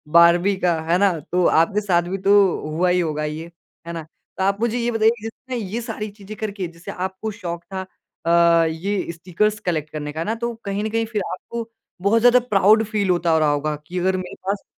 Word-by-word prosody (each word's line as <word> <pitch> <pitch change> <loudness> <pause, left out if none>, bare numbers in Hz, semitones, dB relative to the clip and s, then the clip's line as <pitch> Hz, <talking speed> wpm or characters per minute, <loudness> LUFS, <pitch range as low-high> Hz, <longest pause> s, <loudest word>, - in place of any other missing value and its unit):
Barbie 175 +3 +6
का, 175 -3 +1
है 165 +2 +1
ना? 190 -4 +2
तो 180 +3 0
आपके 195 +6 +3
साथ 180 -4 +2
भी 195 - -2
तो 200 - +6 0.4
हुआ 170 +4 +1
ही 180 0 +3
होगा 155 -3 -1
ये, 155 +3 -5 0.4
है 170 - -4
ना? 165 -1 -5 0.3
तो 190 - 0
आप 195 +1 +1
मुझे 235 0 +1
ये 240 0 0
बताइए 225 0 +2
जिसने 235 +3 -7
ये 220 +1 -3
सारी 215 -2 -5
चीज़ें 205 +1 -10
करके, 200 -4 -3
जैसे 170 0 -9
आपको 190 +4 -4
शौक 170 -4 -6
था 190 - -2 0.4
अ, 170 0 +5
ये 170 +4 -2
स्टिकर्स 190 +5 -1
कलेक्ट 155 -4 -1
करने 150 -1 -4
का, 155 - -6
है 165 - -2
ना? 220 - -1
तो 235 +1 -3
कहीं 200 +1 -2
न 220 - -1
कहीं 225 +1 0
फिर 220 -2 -2
आपको 230 +5 -6 0.3
बहुत 200 +4 +3
ज़्यादा 245 +1 +6
प्राउड 210 +2 +5
फ़ील 205 -3 -1
होता 175 -1 +2
हो 160 - +4
रहा 155 -1 +3
होगा 150 +1 -1
कि 180 +1 -3
अगर 185 +1 +1
मेरे 185 -1 -6
पास 200 0 -1
190 Hz, 225 wpm, -22 LUFS, 170-215 Hz, 0.4 s, Barbie